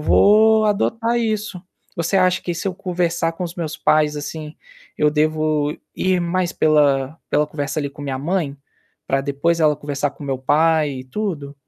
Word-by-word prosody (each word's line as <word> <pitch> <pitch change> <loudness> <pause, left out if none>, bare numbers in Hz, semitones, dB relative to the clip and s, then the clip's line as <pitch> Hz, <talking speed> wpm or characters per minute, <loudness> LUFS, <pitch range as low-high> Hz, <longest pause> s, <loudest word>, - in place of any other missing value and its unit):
vou 215 +7 +5
adotar 225 +3 +1
isso. 215 -5 -2 0.3
Você 170 +3 0
acha 185 -1 +3
que 175 - -3
se 165 - -5
eu 185 - -1
conversar 175 -3 -1
com 180 +2 -5
os 170 -1 -6
meus 160 -4 -4
pais, 150 -1 +2
assim, 150 +1 -6 0.4
eu 150 0 +3
devo 155 -1 0 0.2
ir 185 -1 +1
mais 175 +1 -1
pela 145 -1 +2
pela 150 0 +2
conversa 145 0 -4
ali 140 -1 -3
com 140 - -13
minha 135 -2 -3
mãe? 150 -1 -2 0.5
Para 135 0 +1
depois 145 +4 0
ela 150 -1 +3
conversar 145 -1 -2
com 145 - -11
meu 135 -2 -2
pai 155 +3 +2
e - - -11
tudo? 145 -2 -4
155 Hz, 175 wpm, -20 LUFS, 145-180 Hz, 0.5 s, vou